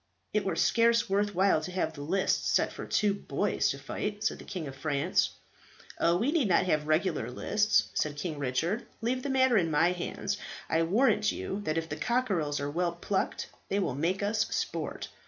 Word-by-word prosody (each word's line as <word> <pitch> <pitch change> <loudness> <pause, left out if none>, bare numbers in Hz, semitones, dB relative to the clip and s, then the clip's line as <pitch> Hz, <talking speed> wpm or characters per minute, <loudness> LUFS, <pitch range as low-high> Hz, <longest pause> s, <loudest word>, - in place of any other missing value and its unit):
"It - - +2
were - - -1
scarce 235 0 +3
worth 205 +1 0
while 190 -3 +3
to 155 - -6
have 180 -3 -1
the 145 - -9
lists 185 +7 +1
set - - +2
for - - -7
two 205 -1 +2
boys 205 0 0
to 140 - -2
fight," 205 +10 -4
said - - 0
the - - -11
King 180 -6 -5
of 135 - -8
France. 145 +4 +1 0.7
"Oh, 170 +1 +3
we 235 +9 +1
need 305 -8 +2
not 180 0 +3
have 155 -4 +1
regular 155 - +1
lists," 210 +11 +1
said 150 -1 -1
King 150 -1 -4
Richard. 160 - -1
"Leave 250 +3 0
that 280 - -4
matter 260 -3 +4
in 170 -4 +2
my 155 +3 +3
hands. 180 +3 -3 0.3
I 160 - +2
warrant 210 +4 +3
you 200 +2 -4
that 155 +1 0
if 165 0 -1
the 150 - -5
cockerels 190 -9 0
are 145 0 -3
well 170 +2 0
plucked, 190 +3 -2 0.2
they 195 - 0
will 185 -10 0
make 170 +8 -1
us 215 +1 +1
sport. - - -3
185 Hz, 200 wpm, -29 LUFS, 155-210 Hz, 0.7 s, matter